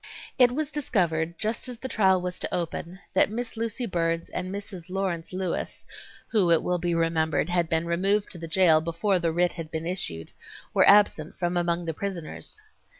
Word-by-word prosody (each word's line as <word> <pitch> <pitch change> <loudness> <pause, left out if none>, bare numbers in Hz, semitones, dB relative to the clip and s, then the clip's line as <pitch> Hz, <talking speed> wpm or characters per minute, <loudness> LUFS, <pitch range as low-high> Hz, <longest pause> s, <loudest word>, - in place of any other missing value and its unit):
It 245 -1 +7
was 300 +3 -2
discovered 170 - 0
just 220 +4 -2
as 245 - -6
the 260 - -5
trial 190 -6 +3
was 180 0 -4
to - - -2
open 170 +1 -3 0.2
that - - +4
Miss 235 +2 -5
Lucy 230 +2 -2
Burns 165 -3 -1
and 185 - -3
Mrs. 195 -3 -7
Lawrence 185 -3 -2
Lewis, 185 -2 -3 0.4
who 200 -6 +3
it 165 -1 +4
will 180 0 0
be 170 0 0
remembered 165 -1 +1
had 175 -2 +1
been 160 +1 +1
removed 195 +5 +1
to 175 - -8
the 165 - -6
jail 165 -2 +5
before 170 +4 0
the 170 -1 0
writ 175 +1 +2
had 165 -2 -7
been 160 0 -4
issued, 90 - -3 0.4
were - - +6
absent 200 -6 +4
from 175 0 -1
among 175 0 0
the 165 - -2
prisoners. 185 - -4
175 Hz, 190 wpm, -26 LUFS, 165-200 Hz, 0.4 s, It